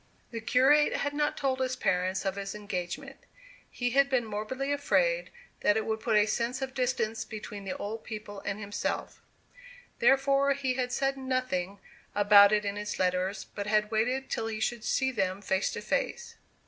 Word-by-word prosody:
The 230 Hz, -1 st, -5 dB
curate 270 Hz, +6 st, +4 dB
had 285 Hz, +1 st, -1 dB
not 295 Hz, 0 st, 0 dB
told 265 Hz, -2 st, 0 dB
his 260 Hz, 0 st, 0 dB
parents 185 Hz, -4 st, 0 dB
of 195 Hz, 0 st, 0 dB
his 200 Hz, 0 st, -5 dB
engagement. 185 Hz, -4 st, -5 dB, 0.5 s
He 245 Hz, 0 st, -2 dB
had 275 Hz, +2 st, +4 dB
been 255 Hz, -3 st, +1 dB
morbidly 220 Hz, +6 st, -3 dB
afraid -, -, +1 dB, 0.3 s
that 210 Hz, -, +3 dB
it 220 Hz, -, -1 dB
would 220 Hz, 0 st, -1 dB
put 220 Hz, 0 st, 0 dB
a 210 Hz, -, +5 dB
sense 235 Hz, +3 st, -1 dB
of 265 Hz, -1 st, -4 dB
distance 245 Hz, -4 st, -1 dB
between 210 Hz, -2 st, -8 dB
the 190 Hz, -, -4 dB
old 220 Hz, +2 st, -5 dB
people 210 Hz, -2 st, -7 dB
and 195 Hz, +1 st, -4 dB
himself. 205 Hz, 0 st, -4 dB, 0.8 s
Therefore 275 Hz, +1 st, +4 dB
he 270 Hz, -2 st, -1 dB
had 250 Hz, -1 st, -2 dB
said 270 Hz, +1 st, 0 dB
nothing 255 Hz, -8 st, -2 dB, 0.4 s
about 205 Hz, 0 st, +7 dB
it 210 Hz, -1 st, +2 dB
in 200 Hz, 0 st, -2 dB
his 210 Hz, 0 st, -4 dB
letters, 185 Hz, +2 st, 0 dB
but 205 Hz, -1 st, -4 dB
had 210 Hz, 0 st, +2 dB
waited 250 Hz, +5 st, 0 dB
till 225 Hz, -, -1 dB
he 220 Hz, -1 st, -4 dB
should 235 Hz, 0 st, -1 dB
see 265 Hz, +1 st, +1 dB
them 195 Hz, -5 st, -1 dB
face 190 Hz, -1 st, 0 dB
to -, -, -4 dB
face. 480 Hz, -1 st, -2 dB
225 Hz, 180 wpm, -29 LUFS, 205-265 Hz, 0.8 s, about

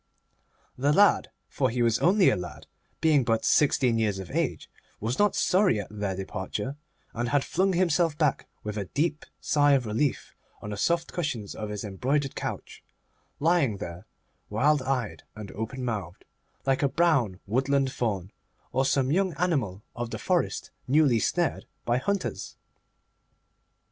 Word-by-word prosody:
The 140 Hz, +3 st, +3 dB
lad—for 205 Hz, +5 st, +2 dB
he 120 Hz, +1 st, 0 dB
was 115 Hz, -1 st, +2 dB
only 190 Hz, +2 st, +5 dB
a -, -, +1 dB
lad, 90 Hz, -1 st, -7 dB, 0.4 s
being 155 Hz, -4 st, +4 dB
but 115 Hz, -1 st, 0 dB
sixteen 125 Hz, -5 st, +3 dB
years 105 Hz, -3 st, +1 dB
of 95 Hz, -3 st, -7 dB
age—was 115 Hz, +4 st, -4 dB
not 205 Hz, -1 st, +3 dB
sorry 185 Hz, -, +3 dB
at 100 Hz, -, -6 dB
their 100 Hz, -2 st, -3 dB
departure, 95 Hz, +6 st, -4 dB, 0.4 s
and 120 Hz, +1 st, -2 dB
had 145 Hz, 0 st, +2 dB
flung 190 Hz, +1 st, +1 dB
himself 170 Hz, -3 st, +2 dB
back 150 Hz, -5 st, +1 dB, 0.2 s
with 105 Hz, 0 st, -4 dB
a 100 Hz, -, -2 dB
deep 150 Hz, -, -1 dB
sigh 145 Hz, -1 st, +3 dB
of 130 Hz, -3 st, +2 dB
relief 115 Hz, +6 st, -1 dB, 0.3 s
on 105 Hz, -, -7 dB
the -, -, -3 dB
soft 170 Hz, +8 st, 0 dB
cushions 125 Hz, -, -3 dB
of 105 Hz, -1 st, -5 dB
his 105 Hz, -1 st, -4 dB
embroidered 130 Hz, +8 st, -1 dB
couch, -, -, -6 dB, 0.6 s
lying 155 Hz, -, +2 dB
there, 90 Hz, +3 st, -8 dB, 0.4 s
wild 140 Hz, +7 st, +3 dB
eyed 125 Hz, -, -2 dB
and 105 Hz, -2 st, -8 dB
open 120 Hz, +4 st, -5 dB
mouthed, 100 Hz, -7 st, -4 dB, 0.4 s
like 135 Hz, -1 st, +2 dB
a 140 Hz, -, +3 dB
brown 135 Hz, -, +2 dB
woodland 135 Hz, +5 st, +1 dB
Faun, 100 Hz, -7 st, -2 dB, 0.4 s
or 130 Hz, +1 st, +1 dB
some 135 Hz, 0 st, +2 dB
young 185 Hz, +2 st, +2 dB
animal 135 Hz, -, -1 dB
of 120 Hz, 0 st, -4 dB
the -, -, -4 dB
forest -, -, -1 dB, 0.2 s
newly 135 Hz, -3 st, +4 dB
snared 175 Hz, +8 st, 0 dB, 0.2 s
by 120 Hz, +1 st, +2 dB
the -, -, -14 dB
hunters. 200 Hz, -2 st, -2 dB
130 Hz, 155 wpm, -27 LUFS, 105-150 Hz, 0.6 s, only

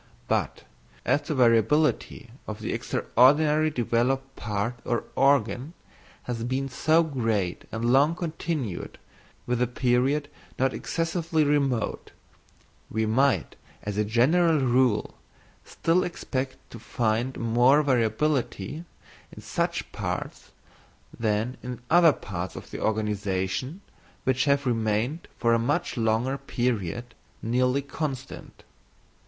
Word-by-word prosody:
But -, -, -1 dB, 0.4 s
as 145 Hz, -, +2 dB
the 150 Hz, +1 st, -3 dB
variability 120 Hz, +1 st, +2 dB, 0.2 s
of 110 Hz, 0 st, -5 dB
the 110 Hz, -, -3 dB
extraordinarily 150 Hz, +5 st, +3 dB
developed 135 Hz, +1 st, 0 dB
part 105 Hz, +3 st, -3 dB
or 120 Hz, -1 st, -1 dB
organ 135 Hz, +1 st, +2 dB, 0.5 s
has 115 Hz, -2 st, -4 dB
been 130 Hz, +3 st, -2 dB
so 155 Hz, +6 st, +3 dB
great 115 Hz, -, -1 dB
and 115 Hz, +1 st, -3 dB
long 145 Hz, +5 st, +4 dB
continued 160 Hz, -, -4 dB, 0.5 s
within 125 Hz, 0 st, +1 dB
a -, -, +1 dB
period 130 Hz, +4 st, +1 dB, 0.3 s
not 130 Hz, 0 st, +1 dB
excessively 165 Hz, -1 st, -1 dB
remote, 140 Hz, -6 st, 0 dB, 0.8 s
we 110 Hz, +1 st, 0 dB
might, 130 Hz, +5 st, +1 dB, 0.3 s
as 105 Hz, -1 st, -4 dB
a -, -, +3 dB
general 155 Hz, +10 st, +3 dB
rule, 125 Hz, -4 st, +2 dB, 0.5 s
still 170 Hz, +3 st, +1 dB
expect 130 Hz, -6 st, -3 dB
to 115 Hz, -, -9 dB
find 120 Hz, +2 st, -1 dB
more 120 Hz, +6 st, +4 dB
variability 130 Hz, -, 0 dB, 0.5 s
in -, -, -11 dB
such -, -, -2 dB
parts -, -, -5 dB, 0.6 s
than 110 Hz, +2 st, -1 dB
in 125 Hz, -1 st, -6 dB
other 170 Hz, -1 st, +7 dB
parts 90 Hz, -8 st, -6 dB
of -, -, -10 dB
the -, -, -6 dB
organisation 105 Hz, -, -1 dB, 0.4 s
which 130 Hz, 0 st, +1 dB
have 140 Hz, -1 st, +2 dB
remained 115 Hz, +6 st, 0 dB
for 115 Hz, 0 st, +2 dB
a 115 Hz, -, +3 dB
much 145 Hz, +9 st, -1 dB
longer 115 Hz, +3 st, 0 dB
period 120 Hz, -3 st, -2 dB, 0.3 s
nearly 125 Hz, +4 st, +1 dB
constant. 140 Hz, -2 st, -6 dB
125 Hz, 115 wpm, -26 LUFS, 115-145 Hz, 0.8 s, other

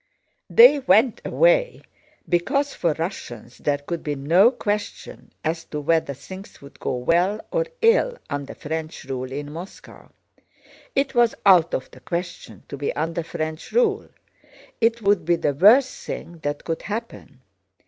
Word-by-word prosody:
They 460 Hz, -11 st, +7 dB
went 245 Hz, -3 st, +3 dB
away -, -, +2 dB, 0.4 s
because 275 Hz, +12 st, 0 dB
for 170 Hz, -3 st, 0 dB
Russians 125 Hz, -, -6 dB
there 145 Hz, -1 st, 0 dB
could 160 Hz, +4 st, -5 dB
be 150 Hz, -1 st, -3 dB
no 165 Hz, +11 st, +4 dB
question 210 Hz, -4 st, -5 dB
as 165 Hz, +1 st, -2 dB
to 150 Hz, -, -5 dB
whether 155 Hz, -2 st, 0 dB
things 190 Hz, +8 st, -11 dB
would 140 Hz, 0 st, -15 dB
go -, -, -2 dB
well 175 Hz, +11 st, +1 dB
or -, -, 0 dB, 0.2 s
ill 480 Hz, +2 st, +3 dB
under 145 Hz, -2 st, -5 dB
French 160 Hz, +1 st, -5 dB
rule 130 Hz, -1 st, -5 dB
in 145 Hz, +2 st, -5 dB
Moscow. 175 Hz, +4 st, -11 dB, 0.9 s
It 275 Hz, 0 st, +1 dB
was 240 Hz, -2 st, +3 dB
out 175 Hz, -4 st, +5 dB
of 130 Hz, -, -5 dB
the -, -, -15 dB
question 170 Hz, 0 st, -6 dB
to 140 Hz, -, -7 dB
be 140 Hz, -, -2 dB
under 165 Hz, +2 st, -2 dB
French 155 Hz, 0 st, -5 dB
rule, 450 Hz, -3 st, +1 dB, 0.7 s
it 230 Hz, 0 st, +2 dB
would 200 Hz, -3 st, +3 dB
be 170 Hz, +2 st, +2 dB
the 150 Hz, -3 st, -1 dB
worst 230 Hz, -, +4 dB
thing 170 Hz, -1 st, -7 dB
that 145 Hz, -1 st, -4 dB
could 165 Hz, -1 st, -3 dB
happen. 210 Hz, -, -7 dB
170 Hz, 150 wpm, -23 LUFS, 150-230 Hz, 0.9 s, They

